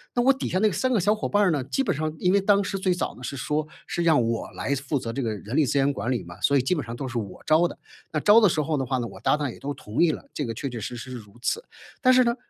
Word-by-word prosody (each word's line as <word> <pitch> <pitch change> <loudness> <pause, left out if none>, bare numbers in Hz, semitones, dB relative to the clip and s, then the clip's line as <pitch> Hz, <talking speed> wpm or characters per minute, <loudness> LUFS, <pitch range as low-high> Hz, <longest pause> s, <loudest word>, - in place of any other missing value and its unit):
那 245 - +3
我 270 +2 +6
底 270 - -4
下 185 - 0
那 215 +3 +4
3 255 +7 0
个 235 - +3
小 205 +4 +3
伙 215 - -3
伴 205 0 +3
儿 185 - +4
呢， 145 -4 0
基 205 - -1
本 195 - 0
上 155 +1 -2
因 180 +3 +2
为 200 - +4
当 200 +1 +4
时 195 - -3
最 190 -1 +1
早 180 - -3
呢 - - -14
是 130 +3 -4
说， 150 +4 -1 0.2
是 - - -3
让 160 -5 +4
我 115 0 -2
来 140 - -2
负 140 +2 -2
责 115 -2 -5
这 135 - -2
个 115 -3 -1
人 105 +5 -6
力 155 - +5
资 140 - 0
源 140 +1 +3
管 125 -1 -2
理 125 - -1
嘛， 85 +3 -12
所 140 - +4
以 - - +3
基 130 - +1
本 150 - -2
上 115 - -6
都 135 +2 -4
是 125 -1 -4
我 100 -4 -7
招 160 +2 +4
的。 - - -10 0.3
那 155 - 0
招 210 +7 +6
的 210 - +6
时 155 - 0
候 155 +1 -1
的 135 - 0
话 130 +1 -1
呢， 120 - -2
我 - - -11
搭 - - +3
档 145 -2 -2
也 - - -12
都 145 +1 -4
同 105 -2 -3
意 170 -2 +5
了， - - -7
这 150 - -2
个 115 -4 -4
确 140 - -4
确 120 -3 -5
实 120 +4 -5
实 130 +2 -8
是 125 - -5
如 105 -3 -14
此。 460 - -1 0.4
但 255 -1 +6
是 255 0 +5
呢， 235 0 +2
150 Hz, 365 characters per minute, -25 LUFS, 125-190 Hz, 0.4 s, 我